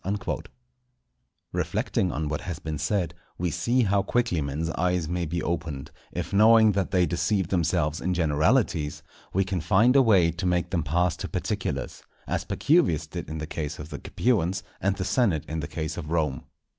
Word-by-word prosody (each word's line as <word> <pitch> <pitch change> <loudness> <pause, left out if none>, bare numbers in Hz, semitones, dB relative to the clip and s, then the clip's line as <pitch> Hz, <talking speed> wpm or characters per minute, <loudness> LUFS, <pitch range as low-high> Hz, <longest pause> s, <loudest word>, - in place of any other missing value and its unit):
_" 100 0 -2 1.1
Reflecting 90 -2 0
on 80 +1 -2
what 75 0 -2
has 90 -4 -5
been 75 -1 -5
said, 90 +2 0 0.2
we 90 -1 -1
see 125 +9 +1
how 100 -1 +2
quickly 100 -5 0
men's 75 +4 -2
eyes 90 -1 0
may 85 0 -2
be 85 +3 -2
opened, 80 -4 -3 0.2
if 90 +2 -4
knowing 110 +1 +7
that 100 -2 -1
they 90 -2 +3
deceive 90 +2 0
themselves 85 -4 0
in 90 +1 0
generalities, 80 - +1 0.3
we 95 - +2
can 95 -2 -2
find 105 - +4
a 135 - +8
way 95 -9 +4
to 85 +3 -3
make 90 +1 0
them 85 -4 +1
pass 85 +3 +1
to - - -4
particulars; - - -3 0.2
as - - -2
Pacuvius 115 - +2
did 85 +3 -7
in 80 - -4
the 80 - -4
case 75 -1 -4
of 75 +1 -8
the 70 -3 -6
Capuans, 95 -6 0 0.2
and 100 0 +1
the 95 - -3
senate 95 - +1
in 80 +1 -3
the 75 - -3
case 80 0 -4
of 80 -3 -5
Rome. 75 -6 -1
85 Hz, 185 wpm, -26 LUFS, 80-95 Hz, 1.1 s, a